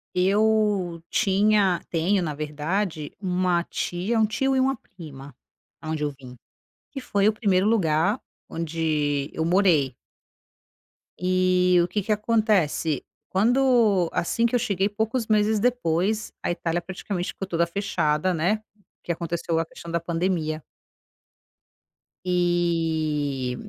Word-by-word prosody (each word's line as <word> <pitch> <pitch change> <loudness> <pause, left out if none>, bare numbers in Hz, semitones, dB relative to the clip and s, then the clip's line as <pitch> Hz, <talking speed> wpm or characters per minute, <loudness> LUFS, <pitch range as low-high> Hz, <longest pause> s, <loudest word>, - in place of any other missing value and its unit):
Eu 200 -2 +2
tinha 200 -2 +2
tenho 180 +4 +1
na 155 -4 -2
verdade, 155 +2 -3
uma 180 -2 +1
tia 180 +6 -2
um 220 - +4
tio 265 +5 0
e - - +3
uma 265 +1 +2
prima 145 - -12 0.4
aonde 155 -1 -4
eu 150 - 0
vim, 130 -3 -13 0.5
que 275 - -6
foi 205 -5 +1
o - - +3
primeiro 200 -3 +1
lugar 190 0 +2 0.3
onde 155 -3 -1
eu 160 - -2
morei. 170 -7 +3 1.2
E 180 0 +3
o 170 - -1
que 210 - -1
que 215 +3 -1
acontece, 210 - +1 0.2
quando 225 -3 +3
assim 230 +7 +1
que 235 - -2
eu - - +5
cheguei, 200 -3 0
poucos 220 +3 -2
meses 215 0 +2
depois 215 -3 0
a - - -1
Itália 170 0 -1
praticamente 180 0 -4
ficou 195 - -5
toda 170 -2 +1
fechada, 170 -2 0
né, 185 +7 0 0.4
que 175 - -2
aconteceu 170 -1 -2
a 165 - -1
questão 170 - -11
da 170 0 0
pandemia. 165 -2 -1 1.6
Eh, 160 -7 0
180 Hz, 125 wpm, -24 LUFS, 160-210 Hz, 1.6 s, eu